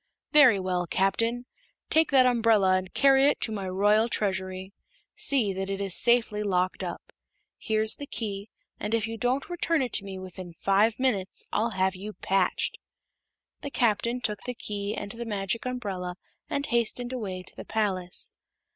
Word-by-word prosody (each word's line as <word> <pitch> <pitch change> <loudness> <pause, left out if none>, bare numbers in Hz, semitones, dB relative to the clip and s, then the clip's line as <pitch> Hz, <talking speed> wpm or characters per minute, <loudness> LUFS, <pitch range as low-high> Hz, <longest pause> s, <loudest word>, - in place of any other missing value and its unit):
"Very 255 -9 +7
well, 180 -2 -1
Captain. 230 +7 0 0.5
Take 320 0 +4
that 265 -2 +5
umbrella 225 -6 +4
and 185 0 -2
carry 270 0 +5
it - - +2
to 220 - +2
my 195 -3 -4
Royal 210 +4 +3
Treasury. 190 -2 -2 0.4
See 275 - +2
that 190 +1 -4
it 195 0 -3
is 195 -2 0
safely 235 -3 +2
locked 185 -3 0
up. - - -7 0.5
Here's 220 -1 +1
the 285 - -7
key, 205 -4 -4 0.3
and 210 +2 -1
if 225 -2 0
you 225 0 -5
don't 245 +5 -1
return 335 -4 0
it 245 - -4
to 200 - +2
me 195 -1 -7
within 185 -2 -9
five 205 +5 +2
minutes 215 -8 0
I'll 225 +2 +1
have 190 0 +2
you 205 +3 -7
patched." 195 -2 0 0.8
The 285 - -5
Captain 235 -1 +1
took 210 -4 -2
the 250 0 -5
key 205 -2 -3
and 205 -2 -5
the 235 +2 -6
Magic 210 +1 -2
Umbrella 195 -8 -4 0.3
and 280 - -1
hastened 240 +1 -1
away 190 -7 -4
to - - -11
the - - -8
palace. 190 -5 -2
210 Hz, 170 wpm, -27 LUFS, 190-240 Hz, 0.8 s, Very